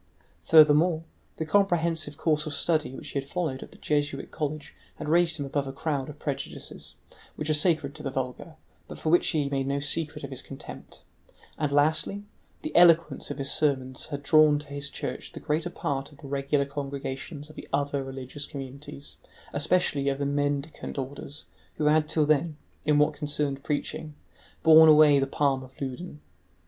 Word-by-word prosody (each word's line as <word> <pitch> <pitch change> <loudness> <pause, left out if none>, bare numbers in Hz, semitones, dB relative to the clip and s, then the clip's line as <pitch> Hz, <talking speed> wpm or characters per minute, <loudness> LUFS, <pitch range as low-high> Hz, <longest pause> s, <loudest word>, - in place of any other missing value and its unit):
Furthermore, 160 +1 +5 0.3
the 160 - -2
comprehensive 165 -5 +1
course 155 -1 +1
of 145 - -3
study 155 -5 0
which - - -8
he 140 - -1
had 135 0 -8
followed 160 -7 -2
at - - -10
the - - -15
Jesuit 145 -2 -1
college 150 0 -4 0.2
had 150 - -7
raised 165 0 +3
him 140 - -2
above 140 0 -2
a - - -4
crowd 140 -1 -2
of 150 - -9
prejudices, 140 -2 -5 0.4
which 150 0 -2
are - - +4
sacred 150 -2 +2
to 155 - -9
the - - -3
vulgar, 130 +4 -5 0.3
but - - -9
for 155 - -2
which 175 - +4
he 150 -4 +1
made 135 -1 -1
no 140 +1 0
secret 150 +2 -2
of - - -6
his - - -5
contempt; - - -10 0.6
and 150 -2 0
lastly, 155 +7 +2 0.4
the 310 - -5
eloquence 165 -1 +5
of 145 - -4
his 140 -1 -1
sermons 130 -4 0
had 145 0 -5
drawn 155 -1 +6
to 145 0 -8
his 140 0 -4
church - - -5
the - - -7
greater 155 +3 -1
part 140 -4 -3
of 145 - -17
the 140 - -11
regular 140 +1 0
congregations 140 +1 -6
of - - -19
the - - -9
other 140 -1 0
religious 135 +2 -6
communities, 140 +1 -8 0.4
especially 145 -2 +1
of 135 - -1
the 140 - -2
mendicant 145 +2 -2
orders, 140 +2 -5 0.3
who 150 - -1
had 155 0 +4
till 155 -2 +2
then, 155 +1 +1 0.3
in 150 -1 +4
what 150 +1 +4
concerned 145 -2 -2
preaching, 150 0 -3 0.5
borne 160 0 +9
away 150 -2 +7
the 135 - 0
palm 135 -1 +1
at 130 0 -16
Loudun. 145 +4 -6
145 Hz, 180 wpm, -27 LUFS, 140-155 Hz, 0.6 s, borne